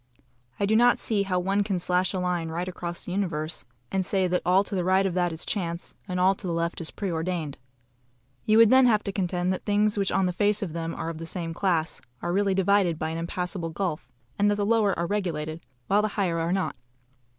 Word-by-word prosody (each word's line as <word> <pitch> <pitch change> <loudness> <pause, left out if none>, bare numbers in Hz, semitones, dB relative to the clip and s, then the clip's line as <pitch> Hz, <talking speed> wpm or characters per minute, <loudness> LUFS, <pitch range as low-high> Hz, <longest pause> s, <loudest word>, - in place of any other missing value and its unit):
I 200 - +2
do 215 +2 +2
not 245 +2 +5
see 215 -3 0
how 190 -2 0
one 195 +3 +1
can 200 -2 -1
slash 180 +1 +1
a 190 - -3
line 180 -2 -1
right 170 +3 -3
across 175 -1 -4
the - - -5
universe, 170 -7 -2 0.3
and 190 -1 +1
say 190 0 +1
that 180 0 0
all 185 +2 +4
to 205 - -8
the 185 -2 0
right 190 +2 +3
of 190 - 0
that 175 -1 +1
is 160 - -4
chance, 170 -4 -3
and 180 -1 -2
all 185 +2 +5
to 190 - -7
the 170 - -1
left 170 +1 -2
is 160 - -2
pre 195 -3 -4
ordained. 165 -3 -3 0.8
You 215 0 +3
would 225 -1 +7
then 260 -1 +7
have 215 -3 +3
to 200 - -3
contend 180 -1 0
that 185 - -5
things 210 0 +2
which 195 - +1
on 195 - +2
the 180 - 0
face 205 +2 +1
of 170 -5 -4
them 165 0 -3
are 165 - -4
of 160 - -9
the 165 - -6
same 165 -1 -3
class, 170 -3 0 0.2
are 175 +5 -2
really 195 0 +2
divided 190 -3 +3
by 160 0 -2
an 165 - -3
impassable 175 0 -3
gulf, 160 -7 -3 0.3
and 205 +1 +4
that 205 - +2
the 205 0 -1
lower 215 -3 +2
are 170 - 0
regulated, 165 -5 -2 0.2
while 200 +2 +3
the 215 - +1
higher 175 -5 +1
are 165 +1 -1
not. 190 0 -1
180 Hz, 240 wpm, -26 LUFS, 170-200 Hz, 0.8 s, would